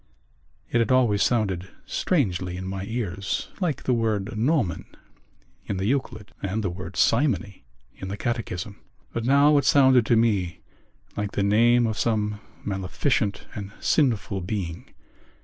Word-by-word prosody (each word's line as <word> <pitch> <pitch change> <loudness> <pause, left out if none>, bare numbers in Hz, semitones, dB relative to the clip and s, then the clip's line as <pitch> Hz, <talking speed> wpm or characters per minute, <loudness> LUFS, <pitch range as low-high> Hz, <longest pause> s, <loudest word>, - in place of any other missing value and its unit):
It 120 - +3
had 115 0 +1
always 120 -6 +3
sounded 95 -6 +1 0.2
strangely 90 - 0
in 95 - -5
my 95 +1 -4
ears, 100 -5 -3
like 170 -8 -1
the 130 - +1
word 110 -1 -1
gnomon 115 - 0 0.8
in 100 - -2
the 95 - -2
Euclid 120 -4 -2
and 100 +3 -2
the 95 - -1
word 90 +1 -8
simony 115 - +1 0.3
in 95 - -7
the 100 +2 -4
Catechism. 105 -5 -3 0.3
But 115 -1 -2
now 140 +3 +5
it - - -1
sounded 130 -4 +5
to 120 - +4
me 100 -7 +1 0.5
like 105 -1 -3
the 100 - 0
name 120 +4 +4
of 110 -2 -2
some 105 -2 0 0.2
maleficent 100 +2 -1
and 100 -1 -7
sinful 115 -9 +1
being. 90 -3 -5
105 Hz, 145 wpm, -25 LUFS, 95-120 Hz, 0.8 s, now